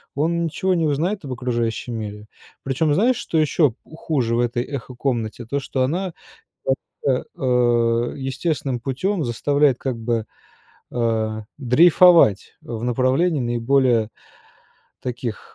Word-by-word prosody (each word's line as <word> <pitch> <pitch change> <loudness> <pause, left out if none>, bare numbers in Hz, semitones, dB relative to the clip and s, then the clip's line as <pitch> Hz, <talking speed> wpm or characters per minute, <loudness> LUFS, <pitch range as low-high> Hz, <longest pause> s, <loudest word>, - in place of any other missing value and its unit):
он 170 +4 0
ничего 185 +4 0
не 165 -2 +1
узнает 165 +6 -1
об 130 - -4
окружающем 120 -1 -2
мире. 105 -1 -6 0.4
Причем 145 +3 +1
знаешь, 235 +9 +3
что 165 - -2
еще 155 -2 +3
х - - -22 0.2
хуже 130 -9 -1
в - - +1
этой 120 0 0
эхо-комнате- 125 -3 -4
то, 140 - 0
что 130 -1 -2
она, 175 +7 -1 1.2
э, 120 -3 +2
естественным 135 -1 -2
путем 155 - -1
заставляет, 140 +2 +2
как 130 -3 -3
бы, 115 -1 -1 0.7
а, 110 -2 -1
дрейфовать 155 - +5
в 115 -1 -6
направлении 130 +7 +1
наиболее 120 -1 +2 0.9
таких, 120 -2 -5
130 Hz, 120 wpm, -22 LUFS, 120-150 Hz, 1.2 s, дрейфовать